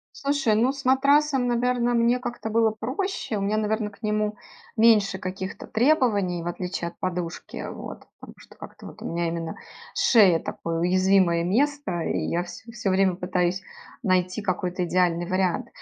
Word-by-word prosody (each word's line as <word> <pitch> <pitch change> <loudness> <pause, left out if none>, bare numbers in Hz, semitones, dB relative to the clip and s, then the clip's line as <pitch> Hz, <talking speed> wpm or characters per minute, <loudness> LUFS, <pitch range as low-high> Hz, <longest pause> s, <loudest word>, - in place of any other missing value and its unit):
Слушай, 275 -6 +1
ну, 240 +5 +3
с 275 0 -9
матрасом, 275 +1 +3
наверно, 245 0 +1
мне 235 +1 +3
как-то 240 -2 -5
было 225 0 +3
проще. 255 - -3
У - - -3
меня, 210 +2 0
наверно, 215 0 -1
к 205 - -21
нему 210 0 -1 0.4
меньше 210 -4 +4
каких-то 190 0 -6
требований, 220 - +2
в - - -8
отличие 180 -1 -4
от - - -15
подушки, 180 -2 -4
вот. - - -9
Потому - - -12
что - - -17
как-то - - -11
вот - - -12
у - - -8
меня, 170 0 -1
именно, 165 -1 -4 0.4
шея- 200 -8 +5
такое, 165 0 -4
уязвимое 185 -1 +3
место, 240 -2 0
и - - -1
я 175 +1 0
всё 200 +6 -10
всё 215 -4 -2
время 190 -1 +3
пытаюсь 180 0 -1 0.4
найти 185 -1 +1
какой-то 180 -2 -2
идеальный 175 -1 +1
вариант. 185 -1 0
200 Hz, 165 wpm, -25 LUFS, 180-235 Hz, 0.4 s, шея